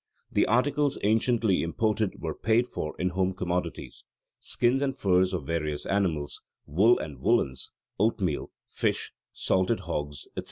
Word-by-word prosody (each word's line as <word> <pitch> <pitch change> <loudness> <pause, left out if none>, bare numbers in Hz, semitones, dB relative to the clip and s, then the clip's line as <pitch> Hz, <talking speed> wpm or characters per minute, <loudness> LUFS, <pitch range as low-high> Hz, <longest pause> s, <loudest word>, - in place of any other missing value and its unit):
The - - +3
articles 140 +4 +2
anciently 110 -1 +2
imported 105 +4 0
were 80 -2 -3
paid 115 +7 +2
for 75 -10 -5
in 90 - 0
home 95 +1 0
commodities 90 0 -3 0.4
skins 125 +3 +1
and 135 -2 -1
furs 95 -1 +3
of 90 -7 -3
various 75 -2 -2
animals, 85 -8 -1 0.2
wool 105 +11 +4
and 75 -2 -6
woollens, 65 -1 +1 0.3
oatmeal, 100 -7 0 0.2
fish, - - -1 0.2
salted 95 +4 +1
hogs, 75 -4 -4
etc. - - -6
95 Hz, 135 wpm, -28 LUFS, 80-115 Hz, 0.4 s, wool